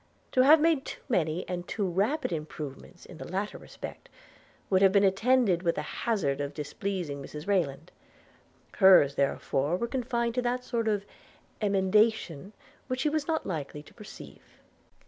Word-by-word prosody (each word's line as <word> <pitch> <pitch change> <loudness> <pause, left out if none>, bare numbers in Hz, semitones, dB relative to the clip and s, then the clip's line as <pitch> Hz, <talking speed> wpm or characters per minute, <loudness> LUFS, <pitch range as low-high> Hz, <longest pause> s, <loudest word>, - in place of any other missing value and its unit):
To 255 - +4
have 300 +5 +7
made 315 -3 +2
too - - -8
many 170 -6 0
and 180 -1 -4
too 205 - -2
rapid 200 - 0
improvements 155 +1 -7
in 170 - -12
the - - -7
latter 200 +3 -3
respect, - - -10 0.6
would 190 -1 +2
have 195 -1 +6
been 200 0 +4
attended 200 -1 +3
with 170 -2 0
the 150 - -3
hazard 150 - -1
of 145 0 -4
displeasing 150 0 -4
Mrs 150 +4 -9
Rayland; 165 -5 -1 0.9
hers 185 -8 +7
therefore 140 +3 0
were 235 - -2
confined 235 -2 -1
to 250 - 0
that 250 +1 -1
sort 230 -2 -2
of 205 -2 0 0.6
emendations 200 -2 +1 0.3
which 255 0 -2
she 300 - +2
was 300 -1 -2
not 320 -1 -1
likely 150 -4 -5
to - - -18
perceive. 210 - -12
195 Hz, 160 wpm, -28 LUFS, 155-235 Hz, 0.9 s, have